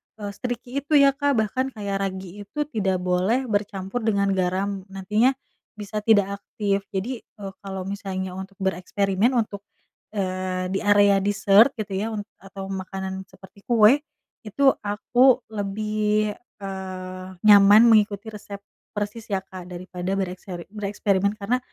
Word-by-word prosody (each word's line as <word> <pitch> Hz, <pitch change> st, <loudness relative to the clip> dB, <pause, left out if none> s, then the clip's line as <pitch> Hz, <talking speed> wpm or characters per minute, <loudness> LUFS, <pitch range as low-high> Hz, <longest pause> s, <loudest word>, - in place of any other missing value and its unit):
eee, 205 Hz, -2 st, -6 dB
se-tricky 245 Hz, +4 st, -4 dB
itu 290 Hz, +2 st, 0 dB
ya 280 Hz, -1 st, +7 dB
Kak. 285 Hz, 0 st, 0 dB
Bahkan 260 Hz, +5 st, -2 dB
kayak 200 Hz, -2 st, -3 dB
ragi 190 Hz, 0 st, -8 dB
itu 295 Hz, +6 st, -2 dB
tidak 190 Hz, -5 st, 0 dB
boleh 185 Hz, +8 st, +1 dB
bercampur 200 Hz, +1 st, -2 dB
dengan 200 Hz, -3 st, +1 dB
garam, 190 Hz, +1 st, -1 dB
nantinya 210 Hz, +7 st, +1 dB, 0.4 s
bisa 210 Hz, 0 st, -4 dB
tidak 205 Hz, -2 st, +2 dB
aktif, 200 Hz, -1 st, -2 dB
jadi, 225 Hz, +6 st, -3 dB
eee, 200 Hz, -3 st, -10 dB
kalau 190 Hz, -1 st, -6 dB
misalnya 190 Hz, -1 st, -4 dB
untuk 190 Hz, +2 st, -8 dB
bereksperimen 195 Hz, +5 st, +1 dB
untuk, 215 Hz, -4 st, -1 dB, 0.6 s
eee, 185 Hz, -1 st, -2 dB
di 195 Hz, -, 0 dB
area 205 Hz, -1 st, +5 dB
dessert 205 Hz, +5 st, +4 dB
gitu 215 Hz, -4 st, -5 dB
ya, 195 Hz, +3 st, -1 dB
unt 205 Hz, -, -3 dB, 0.2 s
atau 195 Hz, 0 st, -8 dB
makanan 190 Hz, 0 st, -5 dB
seperti 190 Hz, +1 st, -18 dB
kue, 235 Hz, +3 st, +6 dB, 0.5 s
itu 270 Hz, +6 st, +4 dB
aku 245 Hz, +5 st, +3 dB
lebih, 210 Hz, +1 st, 0 dB, 0.3 s
eee, 185 Hz, -1 st, -6 dB, 0.2 s
nyaman 210 Hz, +2 st, +8 dB
mengikuti 215 Hz, 0 st, +2 dB
resep 205 Hz, -1 st, -9 dB, 0.3 s
persis 210 Hz, +2 st, -4 dB
ya 195 Hz, -, +1 dB
Kak, 185 Hz, -2 st, -10 dB
daripada 180 Hz, +1 st, -4 dB
berekspe 180 Hz, -1 st, -5 dB
bereksperimen, 200 Hz, -1 st, 0 dB
karena 230 Hz, +5 st, 0 dB
200 Hz, 140 wpm, -24 LUFS, 190-215 Hz, 0.6 s, nyaman